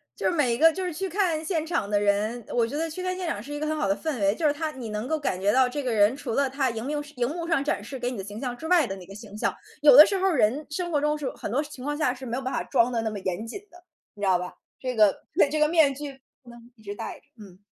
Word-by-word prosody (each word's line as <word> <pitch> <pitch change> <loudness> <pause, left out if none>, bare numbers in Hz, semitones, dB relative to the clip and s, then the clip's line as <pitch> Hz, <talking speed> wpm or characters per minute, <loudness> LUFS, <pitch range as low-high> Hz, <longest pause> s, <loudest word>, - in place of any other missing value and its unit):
就 - - -5
是 - - -1
每 255 -7 +2
一 - - -1
个 325 +3 +7
就 380 - -4
是 360 -3 -3
去 385 +4 -3
看 335 -4 0
现 320 -3 -1
场 320 - -1
的 205 - +2
人 205 +3 0
我 235 -1 +2
觉 285 - -4
得 325 +1 -1
去 365 +4 -6
看 370 0 -2
现 370 - -4
场 205 - -2
是 285 +6 -8
一 - - -3
个 305 - -2
很 310 - 0
好 200 - 0
的 195 - +2
氛 310 -3 -3
围。 200 +1 +2
就 320 - -2
是 290 - +4
它 315 +1 -3
你 245 -6 -7
能 210 +3 -4
够 315 +1 0
感 190 -10 -2
觉 200 +2 +2
到 255 -1 +4
这 290 +3 -3
个 255 - -2
人 205 +2 +4
除 255 -5 -5
了 275 +2 +2
他 270 0 0
荧 225 0 -5
幕 295 +1 -2
荧 245 +1 0
幕 335 +1 -4
上 325 -5 +1
展 290 - -1
示 270 - -7
给 245 0 -2
你 245 - -6
的 195 - -5
形 205 +1 -8
象 250 -2 -3
之 320 - -6
外 350 -4 +4
的 195 -4 -5
那 185 - -11
个 195 - -11
形 210 -1 -10
象。 - - -1 0.3
有 290 -4 +8
的 300 - +12
时 395 - -1
候 380 +1 +2
人 265 0 +1
生 345 +3 -3
活 295 - +2
中 300 0 +1
是 275 -4 -3
很 - - -6
多 265 +7 0
情 290 -4 -10
况 295 0 -2
下 295 -5 +1
是 260 +1 -9
没 235 -1 -3
有 265 - -4
办 260 - -3
法 - - 0
装 245 -2 +2
得 230 -2 0
那 220 - -1
么 210 - -5
严 190 +4 -3
谨 245 - -6
的， 350 +1 -16 0.3
你 205 - -12
知 200 - +1
道 185 -2 +4
吧？ 180 0 -6 0.3
这 255 -1 -3
个 210 -2 +4 0.3
这 310 - 0
个 300 - +4
面 310 -5 +4
具， 280 -2 -7 0.2
不 245 - -15
能 235 0 -12 0.2
一 220 - -22
直 205 -1 -5
戴 - - -6
着， - - -33 0.2
嗯。 190 -2 -14
265 Hz, 355 characters per minute, -26 LUFS, 220-310 Hz, 0.3 s, 的